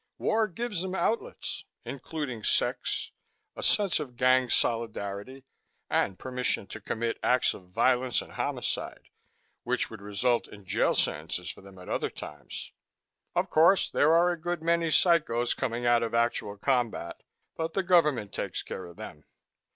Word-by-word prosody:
War 220 0 +2
gives 210 0 -3
them 190 0 -3
outlets 225 +4 -2 0.2
including 140 -4 -5
sex, - - 0 0.4
a - - -6
sense 200 -5 +3
of 130 -5 -6
gang 130 0 +4
solidarity, 115 +2 -1 0.5
and 95 -1 +1
permission 125 -5 -1
to 110 - -8
commit 115 +3 -2
acts 125 0 +3
of 90 -2 -13
violence 125 +5 +2
and - - -8
homicide - - -3 0.5
which - - -1
would - - -9
result 105 +4 0
in 100 -2 -13
jail - - +2
sentences 80 +4 -1
for - - -14
them 95 -1 -14
at 90 - -12
other - - -1
times. - - -8 0.6
Of - - 0
course, 170 +5 +5
there 150 - +4
are 175 +1 +5
a 170 -2 -5
good 175 -1 -2
many 170 0 +2
psychos 155 -8 +3
coming 120 0 -2
out 120 -1 +5
of 115 0 -1
actual 115 -3 0
combat 120 -7 -1 0.3
but 160 0 -3
the 195 - +1
government 150 - +3
takes - - -3
care 95 - -6
of 85 - -13
them. 75 -9 -9
125 Hz, 155 wpm, -29 LUFS, 105-165 Hz, 0.6 s, course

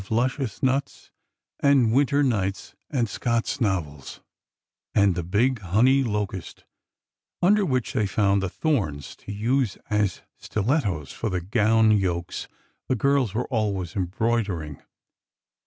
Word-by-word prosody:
11 110 - +1
luscious 130 -2 -1
nuts 135 +1 -1 0.5
and 135 -6 +4
winter 140 +2 +3
nights 100 -7 -1 0.2
and 125 -6 0
Scott's 115 +4 -1
novels; 80 - -2 0.8
and 100 -2 +4
the 90 - -2
big 110 +9 +1
honey 110 +9 +3
locust 105 -5 -4 0.8
under 205 +3 +4
which 130 - -1
they 105 - +1
found 100 0 +2
the 95 - -2
thorns 90 - -2
to - - -10
use 115 +2 0
as 105 -3 0 0.2
stilettos 100 - -1
for 115 - -3
the 90 -2 -1
gown 110 +4 +3
yokes 90 -5 -1 0.4
the 130 - +1
girls 135 -3 +1
were 125 - 0
al 110 -3 +1
ways 90 -3 -5
embroidering. 95 -5 -1
110 Hz, 130 wpm, -25 LUFS, 95-130 Hz, 0.8 s, and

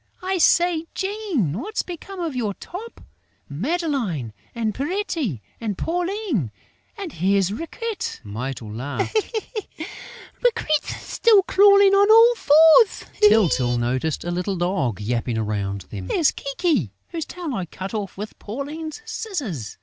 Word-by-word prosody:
I 375 0 0
say, 340 -1 +3
Jean, 385 - -1
what's 425 +7 -2
become 365 +2 -8
of 330 -6 -3
your 215 -6 -1
top?... 435 +7 -9 0.5
Madeleine 220 - -2 0.2
and 225 -2 -1
Pierrette 295 - -2 0.2
and 215 -4 -3
Pauline!... 350 - -1 0.5
And 390 -7 -6
here's 195 +2 +2
Riquette!..." 390 - -4
Mytyl 110 +1 -5
laughed: 135 - -3 1.3
"Riquette's 375 -11 +1
still 430 -4 +4
crawling 400 0 +6
on 400 +1 +5
all 455 +2 +8
fours!" 320 +2 +6 0.2
Tyltyl 175 - +4
noticed 130 +6 -1
a 175 - -3
little 180 +3 -1
dog 175 - -1
yapping 115 +2 -1
around 100 -2 -2
them: 95 0 -8
"There's 300 - +3
Kiki, 275 - -1
whose 325 -2 -4
tail 345 -5 -5
I 185 -6 -3
cut 190 +5 -7
off 205 -4 -4
with 210 +2 -7
Pauline's 300 - -6
scissors.... 280 - -4
265 Hz, 125 wpm, -23 LUFS, -, 1.3 s, all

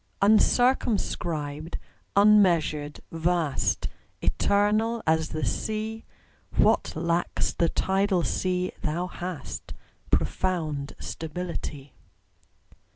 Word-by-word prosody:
UNCIRCUMSCRIBED, 180 - +2 0.4
unmeasured, 175 -8 +4
vast, 165 -3 0 0.3
Eternal 215 +3 +1
as 160 0 +2
the 155 - -2
Sea; 220 +1 -3 0.5
What - - +3
lacks 170 +2 0
the 170 - +1
tidal 190 -2 +1
sea 180 +1 0
thou 165 +3 -1
hast 180 -2 -6 0.3
Profound 155 -6 -1
stability. 160 -4 -5
175 Hz, 75 wpm, -27 LUFS, 155-205 Hz, 0.5 s, unmeasured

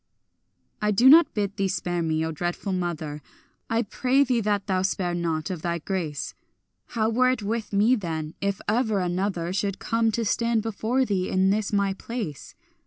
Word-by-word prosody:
I 210 - +1
do 210 +5 +4
not 320 +5 +8
bid 205 -1 -2
thee 195 -1 +1
spare 175 -2 -2
me, 160 -1 0
O 160 - -2
dreadful 175 +4 -3
mother! 160 -5 -3 0.5
I 230 +1 +1
pray 255 +6 +2
thee 250 -3 +1
that 205 -1 0
thou 185 -2 0
spare 185 -2 -1
not, 165 -1 -2
of 175 -4 -5
thy 170 0 -1
grace. 165 -4 -3 0.5
How 220 -2 0
were 250 +3 +3
it 255 -4 -1
with 220 +1 -3
me 210 +5 +4
then, 160 -7 -4
if 200 -1 -1
ever 220 -1 +1
another 180 -1 -1
Should 195 0 -1
come 230 -1 +1
to 230 0 -1
stand 230 +1 +1
before 225 +4 0
thee 190 -5 -1
in 190 +1 +3
this 210 0 0
my 200 -1 +1
place? 200 - -6
200 Hz, 180 wpm, -25 LUFS, 175-225 Hz, 0.5 s, not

